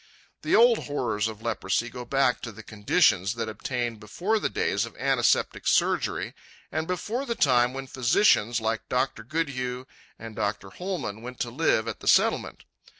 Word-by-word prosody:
The -, -, +2 dB
old 235 Hz, 0 st, +5 dB
horrors 120 Hz, -7 st, -1 dB
of 110 Hz, 0 st, -8 dB
leprosy 115 Hz, 0 st, -1 dB
go 125 Hz, +1 st, -8 dB
back 135 Hz, -1 st, +1 dB
to 115 Hz, -, -6 dB
the 110 Hz, +1 st, -12 dB
conditions 105 Hz, -, +2 dB
that 115 Hz, -1 st, -3 dB
obtained 120 Hz, +1 st, -3 dB
before 180 Hz, -, -1 dB
the -, -, -1 dB
days -, -, 0 dB
of -, -, -8 dB
antiseptic -, -, +1 dB
surgery, -, -, +1 dB, 0.4 s
and 155 Hz, +1 st, -2 dB
before 210 Hz, +8 st, -2 dB
the 235 Hz, -4 st, -3 dB
time 125 Hz, -, +3 dB
when 135 Hz, +1 st, -6 dB
physicians 125 Hz, -, +3 dB
like 110 Hz, 0 st, -2 dB
Dr. 125 Hz, -2 st, 0 dB
Goodhue 130 Hz, -2 st, -3 dB, 0.3 s
and 115 Hz, -1 st, -9 dB
Dr. 105 Hz, -2 st, -3 dB
Hollmann 175 Hz, -, -4 dB
went 125 Hz, +1 st, -9 dB
to 120 Hz, -, -2 dB
live 120 Hz, -5 st, +1 dB
at 115 Hz, -, -4 dB
the -, -, -9 dB
Settlement. -, -, +2 dB
120 Hz, 165 wpm, -26 LUFS, 110-140 Hz, 0.4 s, old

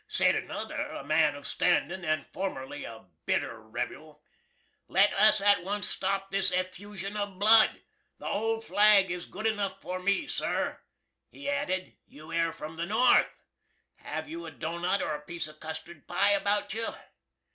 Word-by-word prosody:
Sed -, -, +3 dB
another -, -, -3 dB
(a -, -, -7 dB
man 150 Hz, -3 st, +3 dB
of 145 Hz, 0 st, -10 dB
standin' 185 Hz, +6 st, +1 dB
and 155 Hz, -2 st, 0 dB
formerly 180 Hz, -8 st, -5 dB
a 115 Hz, -3 st, -10 dB, 0.2 s
bitter -, -, -1 dB
rebuel), -, -, -6 dB, 0.6 s
"Let 195 Hz, +3 st, +4 dB
us 215 Hz, +1 st, +6 dB
at 200 Hz, -2 st, +4 dB
once 205 Hz, +2 st, -2 dB
stop 195 Hz, 0 st, -2 dB
this 195 Hz, 0 st, +2 dB
effooshun 190 Hz, +2 st, -4 dB
of 205 Hz, -2 st, -3 dB
Blud! 215 Hz, +2 st, +5 dB, 0.3 s
The -, -, -12 dB
Old 225 Hz, +2 st, -1 dB
Flag 205 Hz, -3 st, +5 dB
is 175 Hz, 0 st, -5 dB
good 215 Hz, -, -7 dB
enuff 200 Hz, -3 st, 0 dB
for 185 Hz, 0 st, -4 dB
me. 200 Hz, +6 st, +1 dB
Sir," -, -, -2 dB, 0.5 s
he 280 Hz, -, -9 dB
added, 280 Hz, -11 st, -2 dB
"you 155 Hz, +2 st, -12 dB
air 165 Hz, 0 st, +2 dB
from 160 Hz, 0 st, -8 dB
the 170 Hz, +1 st, -2 dB
North! 230 Hz, +5 st, +3 dB, 0.5 s
Have -, -, -5 dB
you 330 Hz, +2 st, -7 dB
a -, -, -5 dB
doughnut 170 Hz, +4 st, -1 dB
or -, -, -1 dB
a 150 Hz, -, -5 dB
piece 165 Hz, +1 st, -5 dB
of 155 Hz, 0 st, -14 dB
custard 160 Hz, 0 st, -8 dB
pie 190 Hz, +3 st, +3 dB
about 205 Hz, +1 st, +1 dB
you?" 225 Hz, +1 st, -2 dB
195 Hz, 165 wpm, -29 LUFS, 170-205 Hz, 0.6 s, us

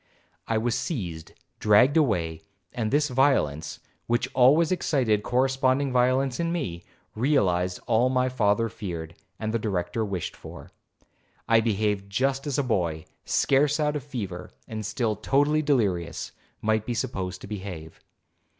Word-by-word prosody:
'I 115 Hz, -, +1 dB
was 115 Hz, +1 st, 0 dB
seized, 95 Hz, -, -4 dB, 0.3 s
dragged 115 Hz, +7 st, +5 dB
away; 85 Hz, -, +1 dB, 0.3 s
and 115 Hz, -3 st, -1 dB
this 145 Hz, +3 st, +2 dB
violence, 125 Hz, -, +1 dB, 0.3 s
which 120 Hz, +2 st, +1 dB
always 150 Hz, +7 st, +5 dB
excited 130 Hz, -, +1 dB
corresponding 130 Hz, +3 st, +1 dB
violence 130 Hz, +1 st, +2 dB
in 170 Hz, 0 st, 0 dB
me, 95 Hz, -, -3 dB, 0.3 s
realized 95 Hz, -8 st, +1 dB
all 120 Hz, +2 st, +3 dB
my 130 Hz, 0 st, +2 dB
father 115 Hz, -3 st, +1 dB
feared, 85 Hz, -7 st, -6 dB, 0.2 s
and 110 Hz, 0 st, -3 dB
the 115 Hz, -, +1 dB
Director 95 Hz, 0 st, -2 dB
wished 95 Hz, -5 st, -4 dB
for. -, -, -11 dB, 0.8 s
I 115 Hz, 0 st, +5 dB
behaved 105 Hz, -3 st, 0 dB
just 135 Hz, +7 st, 0 dB
as 140 Hz, -, -1 dB
a 145 Hz, -, +2 dB
boy, 85 Hz, -10 st, -1 dB, 0.2 s
scarce 145 Hz, +2 st, +2 dB
out 150 Hz, 0 st, +1 dB
of 150 Hz, -, -2 dB
a -, -, -20 dB
fever, 100 Hz, -9 st, -5 dB, 0.2 s
and 110 Hz, -1 st, -5 dB
still 110 Hz, +1 st, -1 dB
totally 145 Hz, +8 st, +2 dB
delirious, 100 Hz, -, 0 dB, 0.3 s
might 110 Hz, 0 st, +1 dB
be 120 Hz, -, -1 dB
supposed 95 Hz, -7 st, -3 dB
to -, -, -8 dB
behave. 95 Hz, -6 st, -7 dB
115 Hz, 145 wpm, -26 LUFS, 95-135 Hz, 0.8 s, dragged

